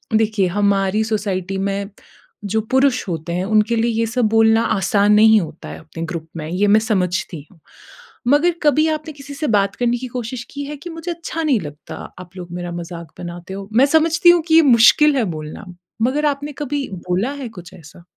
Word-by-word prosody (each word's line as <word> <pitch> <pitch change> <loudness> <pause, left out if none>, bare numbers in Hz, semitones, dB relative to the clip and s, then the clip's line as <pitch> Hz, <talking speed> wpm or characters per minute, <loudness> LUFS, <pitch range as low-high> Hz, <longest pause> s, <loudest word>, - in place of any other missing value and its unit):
देखिए 215 -3 +2
हमारी 200 +2 +1
सोसाइटी 195 -3 -2
में 200 +1 -2 0.6
जो 220 +2 0
पुरुष 265 -2 +2
होते 165 0 -4
हैं 180 +2 -1
उनके 215 +2 +2
लिए 230 +1 +1
ये 230 - +2
सब 240 +1 0
बोलना 225 0 +4 0.2
आसान 200 +2 +2
नहीं 220 +1 +6
होता 160 -1 -8
है - - -8
अपने 160 +1 -8
ग्रुप 160 -1 -6
में, 155 - -5
ये 190 +4 +1
मैं 210 +2 +5
समझती 180 -7 -2
हूँ। 180 - -22 0.7
मगर 295 +7 +4
कभी 305 +2 +3
आपने 310 0 -4
किसी 285 0 -10
से 300 +2 -3
बात 200 -3 +1
करने 245 0 0
की 255 +1 -6
कोशिश 240 0 -5
की 285 0 -5
है 295 +1 -6
कि 320 +5 -9
मुझे 330 +1 -6
अच्छा 330 -1 -5
नहीं 275 -7 +2
लगता 145 0 -9 0.2
आप 185 +1 -12
लोग 175 -1 -8
मेरा 175 0 -5
मज़ाक 170 -2 -7
बनाते 175 +1 -8
हो? 195 0 -7
मैं 250 +5 +5
समझती 320 +4 +3
हूँ 345 -1 +6
कि 320 - +3
ये 330 - +8
मुश्किल 280 +2 +5
है 250 - +2
बोलना, 155 +7 -8 0.4
मगर 280 +5 +1
आपने 290 0 -1
कभी 290 -1 -3 0.2
बोला 190 +9 0
है 245 - -5
कुछ 180 -5 -12
ऐसा? 165 +2 -15
220 Hz, 200 wpm, -19 LUFS, 185-275 Hz, 0.7 s, ये